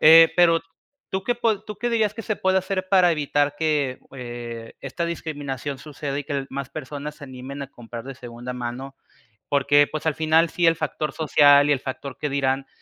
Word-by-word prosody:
eh, 165 +1 +9
pero, 165 -2 +5 0.5
¿tú 190 0 -2
qué 245 +2 0
po 220 -4 +1
tú 210 -1 -8
qué 240 - -1
dirías 220 -3 +2
que 225 - -7
se 215 - -1
puede 190 0 +2
hacer 185 0 -3
para 180 -3 +6
evitar 145 -1 +1
que, 145 -5 0 0.2
eh, 120 -2 -7
esta 170 - -3
discriminación 145 -5 -4
suceda 145 -1 -5
y 145 - -4
que 140 -2 -3
más 135 0 -5
personas 150 0 -6
se 145 - -11
animen 130 +2 -7
a 135 - -8
comprar 115 -1 -9
de 135 +1 -8
segunda 120 0 -7
mano? 125 +2 -6 0.5
Porque, 145 +1 +4
pues, 155 - -4
al 160 - +2
final, 160 +2 +3
sí 175 -1 +2
el 165 - +5
factor 155 -1 -3
social 145 -2 +5
y 145 - +3
el 135 - -1
factor 135 0 -6
qué 150 - 0
dirán, 135 -1 0
145 Hz, 200 wpm, -24 LUFS, 135-165 Hz, 0.5 s, eh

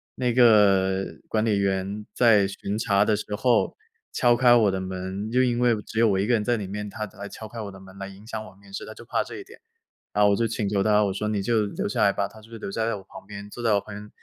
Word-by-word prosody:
那 125 -2 0
个 100 -5 +4
管 110 0 0
理 105 -3 +2
员 100 +2 -1
在 105 -5 +5
巡 100 +1 -4
查 100 -2 +2
的 105 - +2
时 105 0 -4
候， 120 +1 +2 0.4
敲 120 -1 +3
开 120 0 +6
我 110 -4 +4
的 95 - -2
门， 95 +3 -5
就 125 +2 +3
因 120 -1 +1
为 120 -2 +3
只 110 - -4
有 115 - +5
我 95 -1 +1
1 100 - +1
个 120 - +1
人 110 -3 +2
在 120 +1 +1
里 105 - -4
面， 105 +1 -5
他 105 +1 -5
他 100 - -16
来 100 - -5
敲 110 - -9
开 115 +2 -9
我 100 -2 -6
的 95 - -12
门 95 0 -14
来 95 - -5
影 100 +2 -13
响 110 -2 -5
我 95 - -14
面 100 0 -18
试， - - -5
他 - - -9
就 - - -12
怕 - - 0
这 - - -9
一 - - -8
点。 - - -16 0.5
然 105 - +3
后 105 - +5
我 100 - +3
就 115 -1 +1
请 105 -2 -2
求 100 -1 +1
他， 105 +1 +4
我 100 -2 0
说 105 +2 -3
你 105 -2 -1
就 110 0 +2
留 100 - -3
下 - - -1
来 100 - +4
吧。 100 - 0
他 110 - -15
就 110 - -17
留 100 - -6
在 115 +1 -1
我 95 - -9
旁 95 - -13
边， 100 0 -8
坐 120 - -8
在 115 -3 +2
我 100 - +2
旁 105 - -10
边， 105 +1 -9
105 Hz, 310 characters per minute, -25 LUFS, 100-115 Hz, 0.5 s, 开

